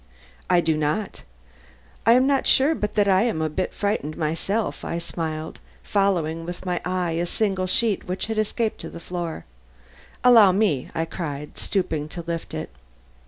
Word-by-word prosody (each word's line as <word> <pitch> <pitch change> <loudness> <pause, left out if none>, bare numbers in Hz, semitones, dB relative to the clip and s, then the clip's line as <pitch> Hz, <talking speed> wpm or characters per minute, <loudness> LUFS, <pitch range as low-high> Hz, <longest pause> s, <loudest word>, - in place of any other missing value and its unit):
"I 180 -1 +5
do 160 -1 +1
not. 155 +7 -1 0.9
I 230 - +8
am 255 +2 +5
not 275 -1 +2
sure 280 +4 +5
but 210 -9 -3
that 205 -1 +3
I 190 -1 +5
am 230 0 +1
a - - -3
little 155 -1 -2
bit 185 - -1
frightened 200 -7 -2
myself," 170 +8 -1
I 170 - -3
smiled, 160 -2 -4 0.2
following 170 -5 +1
with 175 +2 -7
my 180 -1 -1
eye 180 -2 -1
a 170 +2 -1
single 190 -2 0
sheet 220 +1 +1
which 185 +1 -2
had 220 0 -2
escaped 215 +1 -1
to 165 - -6
the - - -9
floor. 170 -1 -5 0.8
"Allow 225 -6 +8
me," 185 -10 +1
I 160 - 0
cried, 150 -4 -5
stooping 160 -6 -1
to 170 +2 -6
lift 170 -1 -4
it. - - -5
180 Hz, 175 wpm, -24 LUFS, 165-210 Hz, 0.9 s, I